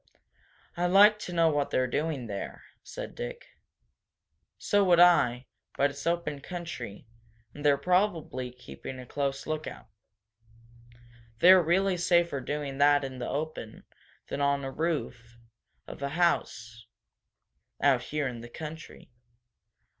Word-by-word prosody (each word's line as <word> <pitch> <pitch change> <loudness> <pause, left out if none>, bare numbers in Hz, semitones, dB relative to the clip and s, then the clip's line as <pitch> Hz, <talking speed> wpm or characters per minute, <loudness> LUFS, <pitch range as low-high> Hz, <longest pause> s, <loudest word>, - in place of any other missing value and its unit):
"I'd 175 +1 0
like 205 +3 +6
to 185 - -6
know 165 -2 +3
what 145 -2 0
they're 130 - +1
doing 145 0 -2
there," 100 -3 -6 0.2
said - - -8
Dick. - - -7 1.1
"So 205 0 +2
would 175 -3 +4
I, 140 -8 +5 0.3
but 140 +1 +2
it's 140 +2 -7
open 170 -4 -1
country, 140 - -7 0.5
and 145 - -10
they're 145 -1 +4
probably 175 -6 0
keeping 125 - -10
a 125 - -9
close 135 +1 -3
lookout. 155 0 -5 1.5
They're 185 +6 +8
really 185 +3 +1
safer 170 -5 +2
doing 140 0 -4
that 145 0 +5
in 130 -1 -6
the 120 - -4
open 145 -7 -5 0.4
than 140 - -4
on 140 0 +1
the 135 - -4
roof 130 -8 -3 0.5
of - - -10
a 140 - -2
house, 115 -9 -1 0.9
out 135 -4 +3
here 150 -2 -2
in 120 -2 -6
the 120 - -10
country." 160 +1 -9
145 Hz, 130 wpm, -28 LUFS, 130-175 Hz, 1.5 s, They're